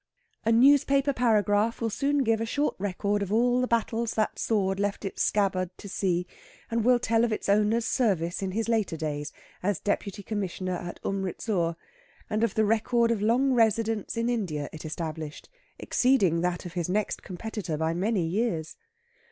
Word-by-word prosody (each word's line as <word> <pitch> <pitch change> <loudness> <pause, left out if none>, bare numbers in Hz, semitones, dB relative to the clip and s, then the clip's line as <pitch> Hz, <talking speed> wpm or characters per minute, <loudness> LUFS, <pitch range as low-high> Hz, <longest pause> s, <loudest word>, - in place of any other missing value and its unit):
A 225 - +3
newspaper 275 +3 +5
paragraph 220 -2 +2
will 225 -2 -1
soon 280 +5 +1
give 225 -2 +1
a - - 0
short 290 +5 0
record 205 +1 -1
of 200 -1 -3
all 245 +3 +3
the 255 - 0
battles 230 0 0
that 215 - 0
sword 195 -3 0
left 205 +1 -2
its 195 - -4
scabbard 190 -3 +1
to 205 - -10
see, 180 -2 0 0.5
and 230 -1 +1
will 250 +1 +5
tell 230 -1 +1
of 235 - +1
its 215 - -3
owner's 210 +3 +3
service 185 -9 0
in 195 - -2
his 225 +4 -2
later 220 -8 0
days 150 -1 -3 0.3
as 195 -1 0
deputy 205 0 -2
Commissioner 190 -3 -3
at 175 0 -6
Umritsur, 190 -2 -1 0.6
and 215 +1 +1
of 230 - 0
the 220 - +3
record 230 +2 +2
of 220 -3 0
long 250 +5 +3
residence 225 -1 +1
in 230 0 0
India 180 -12 -2
it 160 0 -8
established, 155 -1 -5 0.3
exceeding 200 -11 +2
that 180 +1 -1
of 175 - -7
his 175 -2 -2
next 205 +2 -1
competitor 185 -3 -5
by 160 +1 0
many 190 +1 0
years. 170 -3 -2
210 Hz, 175 wpm, -27 LUFS, 180-230 Hz, 0.6 s, newspaper